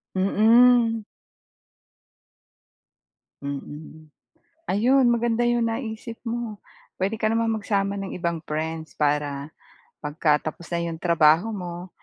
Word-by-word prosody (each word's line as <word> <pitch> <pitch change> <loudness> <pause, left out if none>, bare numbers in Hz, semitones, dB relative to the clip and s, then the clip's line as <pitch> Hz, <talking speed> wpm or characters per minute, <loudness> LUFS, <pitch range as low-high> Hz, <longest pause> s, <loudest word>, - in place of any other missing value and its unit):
Mm. 225 +3 +4 2.4
Mm. 150 +2 -8 0.6
Ayun 255 +7 +4
maganda 235 0 +1
yung 240 -1 +2
naisip 225 -1 -5
mo. 230 -3 -4 0.3
Puwede 195 +4 -1
ka 220 - +1
namang 225 -1 +1
magsama 200 -1 -1
ng 195 -1 -5
ibang 170 -2 -2
friends 160 +1 -4
para 145 -1 -1 0.5
'pagka 150 +1 +1
tapos 170 - -14
na 170 - 0
'yong 165 -1 -4
trabaho 170 +2 +4
mo, 175 -1 -6
195 Hz, 105 wpm, -24 LUFS, 160-225 Hz, 2.4 s, Mm